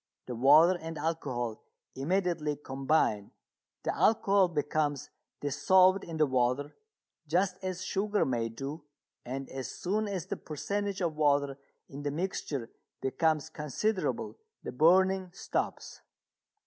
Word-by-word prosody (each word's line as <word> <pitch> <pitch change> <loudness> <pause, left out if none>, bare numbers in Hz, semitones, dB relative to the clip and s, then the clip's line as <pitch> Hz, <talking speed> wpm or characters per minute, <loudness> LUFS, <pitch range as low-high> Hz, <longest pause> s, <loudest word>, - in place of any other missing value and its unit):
The 125 - -5
water 155 +9 +6
and 165 0 -6
alcohol 130 -8 -3 0.3
immediately 165 0 0
combine 135 -7 0 0.5
the - - -1
alcohol 200 -3 +4
becomes 150 -3 -1 0.3
dissolved 185 +7 +4
in 165 -1 -6
the 155 - +4
water 130 +2 0 0.5
just 180 +4 +1
as 185 -1 -3
sugar 205 +2 0
may 120 -3 -1
do, 140 +7 -6 0.4
and 135 +2 -4
as 130 -2 -5
soon 210 +4 -2
as 190 -6 -3
the - - -4
percentage 200 +6 -3
of 165 -3 0
water 140 -2 +2 0.3
in 140 +1 -8
the 145 - -1
mixture 145 -6 -3 0.3
becomes 155 +3 0
considerable 210 - -2 0.2
the - - -5
burning 185 +5 +4
stops. - - -3
155 Hz, 120 wpm, -30 LUFS, 135-185 Hz, 0.5 s, water